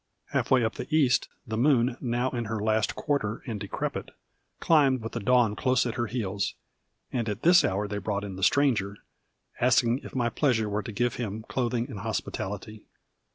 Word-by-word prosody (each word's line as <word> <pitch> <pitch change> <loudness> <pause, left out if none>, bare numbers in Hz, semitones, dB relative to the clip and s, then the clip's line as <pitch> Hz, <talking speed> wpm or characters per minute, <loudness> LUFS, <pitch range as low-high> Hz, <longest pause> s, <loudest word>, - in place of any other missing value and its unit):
Half - - -1
way 130 -2 +4
up 110 - -1
the - - -6
east, 145 -5 +3 0.2
the 110 -1 -3
moon, 125 -2 +3
now 120 0 0
in 120 -2 -3
her 110 0 -3
last 110 0 +1
quarter 120 -7 -1
and 110 -4 -4
decrepit, - - -4 0.5
climbed 135 -7 +3
with 115 - -5
the 115 - -3
dawn 115 -1 +3
close 130 +1 +2
at 120 - -2
her 120 -1 -2
heels. 100 -4 -2 0.6
And 115 -3 -1
at 105 +2 -4
this 175 +2 +7
hour 100 +2 0
they 105 0 -3
brought 100 0 -2
in 100 -2 -6
the 95 - -8
Stranger, 105 -5 +2 0.6
asking 120 0 +3
if - - -11
my 120 -2 +1
pleasure 115 -3 +1
were 105 +1 -1
to 110 - -7
give 120 +3 -1
him 110 -2 -4
clothing 120 -1 -1
and 105 - -7
hospitality. 105 +3 -4
115 Hz, 190 wpm, -27 LUFS, 105-125 Hz, 0.6 s, this